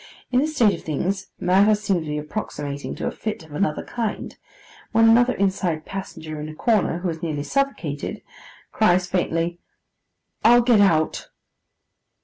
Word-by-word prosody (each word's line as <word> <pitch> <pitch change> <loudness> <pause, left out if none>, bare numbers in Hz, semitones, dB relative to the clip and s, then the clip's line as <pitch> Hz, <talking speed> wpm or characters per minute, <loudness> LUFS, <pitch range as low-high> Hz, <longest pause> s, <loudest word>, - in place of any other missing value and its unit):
In 250 - +3
this 310 +3 -1
state 225 -7 +4
of 170 - -7
things, 185 +6 -2
matters 205 +3 +3
seem 190 -4 +1
to 160 - -7
be 150 0 -2
approximating 150 -3 -5
to - - -5
a - - -1
fix 210 -7 -5
of 155 - -18
another 155 -1 -1
kind, 230 -3 -4 0.6
when 225 0 +5
another 245 +2 +5
inside 185 -5 -1
passenger 160 -5 -6
in 155 - -5
a 155 - -9
corner, 210 -4 +1
who 175 +1 -2
is 160 -1 -5
nearly 150 -4 -2
suffocated, 190 - -2 0.5
cries 185 -4 +3
faintly, 175 -1 -1 0.8
'I'll 240 +2 +7
get 235 -4 +5
out. 160 -5 +2
185 Hz, 155 wpm, -23 LUFS, 160-220 Hz, 0.8 s, I'll